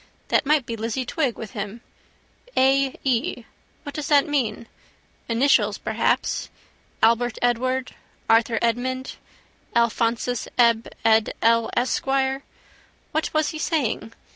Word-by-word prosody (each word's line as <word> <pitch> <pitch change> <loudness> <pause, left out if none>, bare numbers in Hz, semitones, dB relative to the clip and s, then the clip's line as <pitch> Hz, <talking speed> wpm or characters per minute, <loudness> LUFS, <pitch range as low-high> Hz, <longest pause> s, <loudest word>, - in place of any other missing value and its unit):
That - - +2
might 300 -3 +3
be 230 - -4
Lizzie 230 +3 -3
Twigg 270 -3 -1
with 220 -3 -7
him. 210 0 -6 0.8
A. 270 0 +3
E.: 245 -2 -1 0.4
what 285 - -7
does 300 -2 -4
that 290 +1 +4
mean? 245 -7 -1 0.6
Initials 250 +5 +3
perhaps. - - -1 0.5
Albert 235 +1 +3
Edward, 255 +2 0 0.3
Arthur 225 0 +3
Edmund, 255 +3 -1 0.6
Alphonsus 235 +1 +1
Eb 235 -2 +4 0.2
Ed 220 -1 +3
El 230 0 +4
Esquire. 270 +2 0 0.7
What 315 +1 -1
was 310 0 +2
he 315 - -6
saying? 260 -8 -1
245 Hz, 115 wpm, -23 LUFS, 230-270 Hz, 0.8 s, that